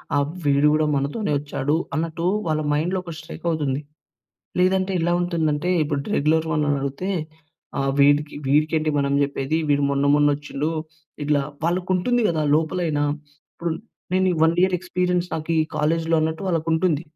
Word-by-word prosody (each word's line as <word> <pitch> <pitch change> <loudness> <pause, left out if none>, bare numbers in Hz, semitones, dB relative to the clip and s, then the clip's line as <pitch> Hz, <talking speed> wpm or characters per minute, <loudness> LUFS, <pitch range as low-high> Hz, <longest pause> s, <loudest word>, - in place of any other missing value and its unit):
ఆహ్, 145 0 +3 0.2
వీడు 140 +1 +4
కూడా 155 0 +2
మనతోనే 145 +7 -1
వచ్చాడు 145 0 -1 0.2
అన్నట్టు 165 +2 -2 0.2
వాళ్ళ 155 -1 0
మైండ్‌లో 170 +6 0
ఒక 170 -2 -7
స్ట్రైక్ 160 +2 -10
అవుతుంది. 145 -3 -1 0.8
లేదంటే 190 +1 +2
ఎలా 170 +1 +1
ఉంటుందంటే, 170 -1 0
ఇప్పుడు 145 -1 -1 0.2
రెగ్యులర్ 160 +2 +2
వాళ్ళని 150 -2 +1
అడుగుతే 140 +7 -3 0.7
ఆహ్, 135 0 +1
వీడికి 145 +1 +4
వీడికి 150 +4 +2
-ఏంటి 155 0 0
మనం 140 0 +1
చెప్పేది 140 +2 -2
వీడు 145 0 +3
మొన్న 140 0 +1
మొన్న 145 0 +4
ఒచ్చిండు 145 +1 -3 0.5
ఇట్లా 145 0 +2 0.2
వాళ్ళకి 180 +2 0
ఉంటుంది 245 +7 +1
కదా! 160 -2 0
లోపలైనా! 155 -1 0 0.5
ఇప్పుడు 170 -1 -2 0.4
నేనీ 185 0 +3
1 175 +3 +3
ఎక్స్‌పీరిఎన్స్ 180 -1 -1
నా‌కీ 160 +1 -2 0.2
కాలేజ్‌లో 165 +2 +1
అన్నట్టు 160 +3 -1
వాళ్ళకుంటుంది. 165 -1 +1
155 Hz, 145 wpm, -23 LUFS, 145-175 Hz, 0.8 s, వీడు